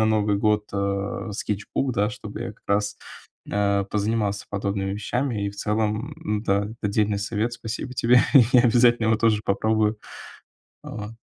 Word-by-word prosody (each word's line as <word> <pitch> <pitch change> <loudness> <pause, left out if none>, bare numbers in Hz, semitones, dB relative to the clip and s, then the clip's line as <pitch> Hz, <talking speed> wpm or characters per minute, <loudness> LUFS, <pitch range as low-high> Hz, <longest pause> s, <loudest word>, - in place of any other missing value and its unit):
на - - +4
Новый 105 -2 +2
год, 105 0 +1
э, 100 +2 -2
скетчбук, 105 +6 -2
да, 105 -1 +1
чтобы - - -8
я - - -4
как - - -28
раз, 100 0 0 0.5
э, 100 -1 +1
позанимался 105 -1 -1
подобными 100 -1 -2
вещами. 110 +1 -2
И - - -2
в 100 - -15
целом, 110 +6 -1 0.3
да, 100 +1 +2
это 110 0 -4
дельный 105 -1 +1
совет. 110 +3 -2
Спасибо 120 +3 -6
тебе. 125 0 +5 0.3
Я 125 -1 +7
обязательно 120 -1 +4
его 110 - +4
тоже 110 -1 +2
попробую. 110 +1 +1 0.8
Вот. 105 0 -7
105 Hz, 155 wpm, -24 LUFS, 100-115 Hz, 0.8 s, Я